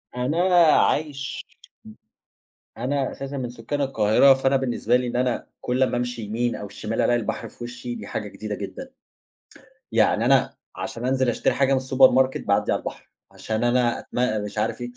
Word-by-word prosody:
أنا 130 +7 -1 0.4
عايش 145 -3 -1
م - - -32 1.2
أنا 135 +1 -1
أساسًا 135 +1 -6
من 125 -2 -3
سُكّان 125 +5 -4
القاهرة، 135 +1 +4
فأنا 135 +1 +1
بالنسبة 125 -2 0
لي 125 0 +1
إن 120 - -4
أنا 125 -1 -1
كلّ 125 +2 +1
ما 125 - 0
أمشي 120 -1 -3
يمين 115 +3 -2
أو 105 - -7
شِمال 110 +2 -3
ألاقي 120 0 +2
البحر 115 - -4
في 120 - -11
وشّي، 120 0 -6
دي - - -8
حاجة 105 - -4
جديدة 105 0 -6
جدًا، 100 - -8 1.0
يعني - - +2
أنا - - +3 0.2
عشان 120 +2 -5
أنزِل 130 -1 +1
أشتري 120 - +1
حاجة 135 0 +2
من 130 - +2
الsupermarket 130 0 +4
باعدي - - +1
على - - +1
البحر، - - -8 0.2
عشان 110 +1 -3
أنا 120 0 +2
أتم 115 -4 -1
مش 105 +1 -7
عارف 110 +3 -1
إيه، 120 0 -5
125 Hz, 175 wpm, -24 LUFS, 115-130 Hz, 1.2 s, القاهرة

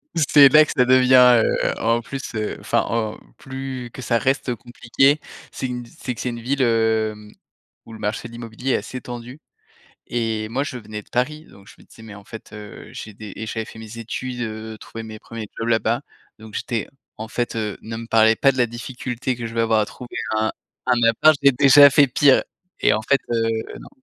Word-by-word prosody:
C'est 145 -3 +7
là 155 +2 +7
que - - -5
ça 125 - +4
devient, 125 -2 +6
heu, - - 0
en 115 +1 +1
plus, 135 +1 -7
heu, 110 -1 -3
enfin, - - +1
en 110 -2 -2 0.2
plus 130 -2 -7
que 130 - -9
ça 120 -1 +1
reste 130 0 0
compliqué, 125 +5 +1 0.3
c'est 130 - -4
gu 125 -1 -4 0.2
c'est 125 -2 -4
que - - -7
c'est 125 - -2
une 120 0 -5
ville, 135 +2 0
hem, 110 -2 0 0.5
où 115 - -12
le 110 - -10
marché 105 +2 -3
de 115 - -14
l'immobilier 115 +3 -4
est - - +3
assez 130 - -7
tendu 125 +3 -8 0.7
et 110 -2 -2
moi, 135 +4 -1
je 130 - -5
venais 105 -2 -8
de - - -26
Paris, 150 +6 -2
donc 100 0 -18
je - - -14
me - - -17
disais: 110 - -16
«Mais 110 -2 -10
en 100 - -13
fait, 110 - -11
heu, 105 -1 -10
j'ai 105 - -8
des» 105 -1 -9
et 110 - -6
j'avais 110 0 -3
fait 110 - -12
mes 110 +1 -10
études, 120 +2 -5
heu, 110 -1 -5
trouver 115 - -9
mes 110 -1 -8
1ers 115 -2 -8
jobs 115 - -3
là-bas. 115 +2 +1 0.4
Donc 110 -1 -13
j'étais: 115 -3 -3 0.3
«En 110 +1 -6
fait, 120 -1 -2
heu, 105 -3 -3
ne 115 +1 -7
me 115 - -7
parlez 110 0 +4
pas 135 +3 +4
de 130 - -9
la 120 -1 +3
difficulté 125 +1 -4
que 115 -1 -4
je 115 - -9
vais 115 - +2
avoir 110 -1 +2
à 105 - +1
trouver 125 +2 -10 0.2
un 110 0 +1 0.4
un 120 -1 +3
appart, 155 +7 +5
j'ai 140 0 +6
déjà 140 +2 +8
fait 140 +1 +5
pire» 135 +1 +4 0.4
et - - +4
en 110 - -1
fait, 135 +4 +2
heu, 115 -1 +1 0.4
non. - - -12
115 Hz, 220 wpm, -22 LUFS, 110-130 Hz, 0.7 s, déjà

